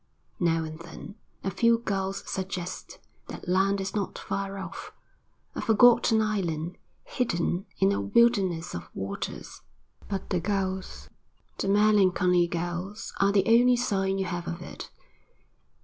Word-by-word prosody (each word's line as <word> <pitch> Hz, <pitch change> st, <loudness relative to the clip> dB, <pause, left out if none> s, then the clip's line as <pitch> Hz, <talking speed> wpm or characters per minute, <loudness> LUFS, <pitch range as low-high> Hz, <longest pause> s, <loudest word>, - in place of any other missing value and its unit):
Now 165 Hz, -2 st, +2 dB
and 155 Hz, 0 st, -7 dB
then 165 Hz, +4 st, -10 dB, 0.3 s
a 195 Hz, -, -1 dB
few 230 Hz, +4 st, +4 dB
gulls 195 Hz, -4 st, -2 dB
suggest 185 Hz, -1 st, -5 dB, 0.3 s
that -, -, -9 dB
land 195 Hz, +2 st, +2 dB
is 195 Hz, 0 st, -3 dB
not 200 Hz, -2 st, -2 dB
far 195 Hz, 0 st, -4 dB
off, 190 Hz, -1 st, -7 dB, 0.6 s
a -, -, -4 dB
forgotten 225 Hz, 0 st, +5 dB
island 175 Hz, -5 st, -2 dB, 0.2 s
hidden 190 Hz, -4 st, -1 dB
in 95 Hz, -, +3 dB
a 100 Hz, 0 st, 0 dB
wilderness 185 Hz, -, +2 dB
of 85 Hz, -, -6 dB
waters; 95 Hz, +1 st, -5 dB, 0.5 s
but 195 Hz, -2 st, -4 dB
the 180 Hz, -, +2 dB
gulls, 190 Hz, 0 st, -3 dB, 0.5 s
the -, -, -1 dB
melancholy 190 Hz, -4 st, +4 dB
gulls, 175 Hz, +4 st, -4 dB
are 195 Hz, 0 st, +4 dB
the 200 Hz, -1 st, +3 dB
only 245 Hz, +2 st, +5 dB
sign 195 Hz, -5 st, 0 dB
you 190 Hz, -, -1 dB
have 175 Hz, -1 st, -4 dB
of 170 Hz, +1 st, -5 dB
it. -, -, -9 dB
190 Hz, 135 wpm, -27 LUFS, 175-205 Hz, 0.6 s, forgotten